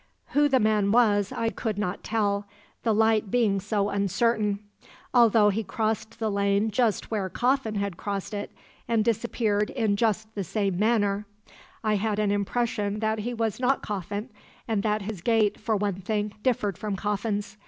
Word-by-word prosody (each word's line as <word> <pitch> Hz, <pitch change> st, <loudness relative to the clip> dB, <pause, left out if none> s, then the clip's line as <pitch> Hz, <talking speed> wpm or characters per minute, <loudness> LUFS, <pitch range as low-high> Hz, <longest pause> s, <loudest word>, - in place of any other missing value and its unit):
"Who 290 Hz, +1 st, +3 dB
the 265 Hz, -2 st, +4 dB
man 210 Hz, -2 st, +2 dB
was 205 Hz, -4 st, +3 dB
I 230 Hz, -, -1 dB
could 220 Hz, -2 st, -3 dB
not 200 Hz, -3 st, -2 dB
tell, 205 Hz, -2 st, 0 dB, 0.3 s
the 230 Hz, -, +1 dB
light 220 Hz, -1 st, +3 dB
being 210 Hz, -3 st, +2 dB
so 205 Hz, +1 st, 0 dB
uncertain. 205 Hz, +1 st, +1 dB, 0.6 s
Although 225 Hz, -4 st, +6 dB
he 215 Hz, +2 st, -1 dB
crossed 220 Hz, +1 st, -2 dB
the 220 Hz, -2 st, -1 dB
lane 200 Hz, +2 st, +1 dB
just 230 Hz, -2 st, 0 dB
where 200 Hz, -4 st, -1 dB
Coffin 245 Hz, +1 st, 0 dB
had 200 Hz, -3 st, -2 dB
crossed 200 Hz, 0 st, -4 dB
it 205 Hz, 0 st, -4 dB, 0.4 s
and 225 Hz, -2 st, +2 dB
disappeared 220 Hz, -2 st, 0 dB
in 220 Hz, -5 st, 0 dB
just 220 Hz, 0 st, 0 dB
the 200 Hz, -, -3 dB
same 195 Hz, 0 st, -1 dB
manner, 210 Hz, -2 st, +1 dB, 0.6 s
I 215 Hz, -1 st, +2 dB
had 210 Hz, +1 st, -1 dB
an 210 Hz, -1 st, +1 dB
impression 205 Hz, 0 st, -1 dB
that 220 Hz, 0 st, 0 dB
he 240 Hz, +3 st, -3 dB
was 225 Hz, -2 st, -1 dB
not 260 Hz, +2 st, +1 dB
Coffin, 205 Hz, +3 st, -4 dB, 0.4 s
and 220 Hz, -3 st, 0 dB
that 210 Hz, -1 st, 0 dB
his 205 Hz, -3 st, -5 dB
gait, 220 Hz, -1 st, +2 dB
for 220 Hz, 0 st, 0 dB
one 200 Hz, -2 st, -2 dB
thing, 210 Hz, +1 st, -2 dB
differed 210 Hz, -7 st, 0 dB
from 210 Hz, -2 st, -2 dB
Coffin's. 205 Hz, +1 st, -2 dB
210 Hz, 170 wpm, -26 LUFS, 200-225 Hz, 0.6 s, Although